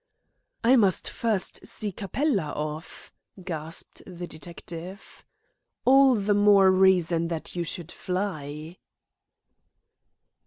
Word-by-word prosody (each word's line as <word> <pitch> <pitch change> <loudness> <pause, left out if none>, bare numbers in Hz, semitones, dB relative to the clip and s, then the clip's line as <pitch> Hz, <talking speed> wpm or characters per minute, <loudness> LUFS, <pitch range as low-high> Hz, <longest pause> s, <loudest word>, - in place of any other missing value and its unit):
"I 250 +3 +6
must 195 -6 +2
first 215 -5 -1
see 210 -1 0
Capella 195 - -1
off," 155 +2 -6 0.3
gasped 165 -2 -6
the 180 -1 -7
detective. 170 +4 -9 0.6
"All 270 0 +6
the 205 -1 +1
more 200 -2 +6
reason 180 -3 +3
that 165 0 -5
you 175 - -1
should 170 0 -5
fly." 165 -4 -5
185 Hz, 95 wpm, -26 LUFS, 165-205 Hz, 0.6 s, I